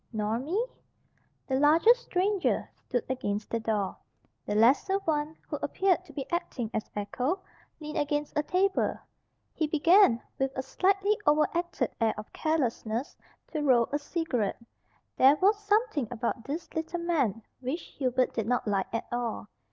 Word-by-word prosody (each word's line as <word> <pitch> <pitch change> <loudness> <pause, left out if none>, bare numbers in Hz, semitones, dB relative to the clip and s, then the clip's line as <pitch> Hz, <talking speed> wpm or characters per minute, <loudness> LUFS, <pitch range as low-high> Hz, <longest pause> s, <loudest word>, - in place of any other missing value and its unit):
"Nor 215 0 -1
me?" 360 - -1 0.8
The 265 -1 0
larger 320 +10 +6
stranger 405 -5 0
stood 245 - -3
against 210 -5 -3
the 230 - 0
door. 215 -3 -1 0.5
The 205 - -1
lesser 265 - +4
one, 305 0 -1
who - - -3
appeared 370 -2 +1
to 315 - -13
be 275 -1 -4
acting 270 -10 -2
as 215 - -3
echo, 255 - -2 0.4
leaned 300 -1 -4
against 295 +1 -1
a 300 - +3
table. 375 +5 +1 0.6
He 310 - 0
began, 325 - +5 0.2
with 270 0 +1
a 260 - -1
slightly 390 +8 +2
overacted 310 +4 +1
air 225 -1 +2
of 210 - -9
carelessness, 255 -6 -1 0.4
to 310 - -2
roll 250 -5 +4
a 290 - 0
cigarette. 285 - -2 0.6
There 270 +3 +7
was 395 +6 +4
something 415 - +1
about 235 0 -3
this 310 +4 -5
little 320 +2 -3
man 275 - 0 0.2
which 265 +6 -3 0.2
Hubert 255 -1 +1
did 225 -2 -2
not 245 -1 0
like 195 -2 0
at 230 - -2
all. 235 -3 -3
290 Hz, 150 wpm, -29 LUFS, 235-345 Hz, 0.8 s, There